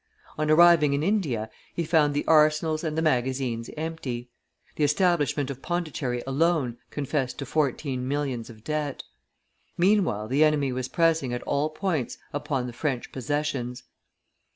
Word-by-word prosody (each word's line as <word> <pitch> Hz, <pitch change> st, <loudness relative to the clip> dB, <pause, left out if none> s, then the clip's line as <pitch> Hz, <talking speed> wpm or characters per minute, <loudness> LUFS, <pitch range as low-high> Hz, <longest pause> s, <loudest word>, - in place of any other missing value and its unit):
On 155 Hz, 0 st, -1 dB
arriving 160 Hz, -2 st, +6 dB
in 140 Hz, +2 st, 0 dB
India, 155 Hz, -, 0 dB, 0.3 s
he 170 Hz, -, 0 dB
found 155 Hz, -3 st, +3 dB
the 145 Hz, -, 0 dB
arsenals 155 Hz, 0 st, +3 dB
and 155 Hz, -1 st, -2 dB
the 160 Hz, -, +1 dB
magazines 130 Hz, -4 st, 0 dB
empty; 135 Hz, -7 st, -4 dB, 0.4 s
the 150 Hz, -, 0 dB
establishment 150 Hz, -3 st, +2 dB
of 135 Hz, -1 st, -8 dB
Pondicherry 155 Hz, -8 st, -2 dB
alone 135 Hz, -3 st, +1 dB
confessed 140 Hz, -2 st, -2 dB
to 140 Hz, -, -4 dB
fourteen 135 Hz, -2 st, -1 dB
millions 135 Hz, -5 st, -2 dB
of 110 Hz, -2 st, -13 dB
debt. 150 Hz, -1 st, -3 dB, 0.7 s
Meanwhile 175 Hz, -, +2 dB
the 135 Hz, +6 st, +3 dB
enemy 150 Hz, -3 st, +2 dB
was 125 Hz, 0 st, -3 dB
pressing 160 Hz, -5 st, +1 dB
at 120 Hz, -, -5 dB
all 145 Hz, +2 st, 0 dB
points 155 Hz, -, -2 dB, 0.2 s
upon 145 Hz, -3 st, -2 dB
the 125 Hz, -, -6 dB
French 130 Hz, -1 st, -2 dB
possessions. 135 Hz, -3 st, -2 dB
145 Hz, 145 wpm, -26 LUFS, 130-155 Hz, 0.7 s, arriving